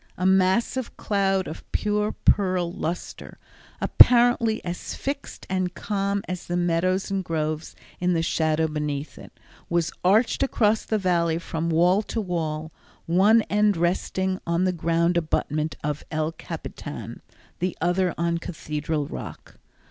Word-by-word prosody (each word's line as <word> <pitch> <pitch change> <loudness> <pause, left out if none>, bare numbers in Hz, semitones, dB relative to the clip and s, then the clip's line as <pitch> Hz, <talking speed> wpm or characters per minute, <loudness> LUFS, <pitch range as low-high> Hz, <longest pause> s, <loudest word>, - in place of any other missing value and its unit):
A 180 - -1
massive 190 +7 +2
cloud 195 -2 +1
of 155 - -7
pure 210 0 0
pearl 185 -3 +2
luster, 175 0 -5 0.4
apparently 240 -2 +5
as 175 0 -5
fixed 280 +1 -5
and 185 -1 -1
calm 200 -1 -1
as 180 -1 -5
the 175 - -1
meadows 175 +3 +1
and 195 -1 -1
groves 155 -1 -3 0.2
in 180 0 +1
the 165 -1 +1
shadow 160 -1 +1
beneath 150 -1 -4
it, - - -12 0.4
was 170 -1 +1
arched 210 +6 +3
across 220 -5 +2
the 220 - 0
Valley 170 -4 +1
from 165 -1 -3
wall 175 +5 +4
to 225 - -4
wall, 160 -5 -3 0.3
one 205 +7 +5
end 210 -2 +2
resting 185 +2 0
on 170 +1 +1
the 185 -1 +2
grand 170 +1 +1
abutment 155 -1 -1
of 150 0 -2
El 155 0 -1
Capitan, 165 - -7 0.4
the 180 0 -2
other 180 0 +1
on 170 0 0
Cathedral 155 -2 -3
Rock. - - -9
180 Hz, 140 wpm, -25 LUFS, 165-195 Hz, 0.4 s, apparently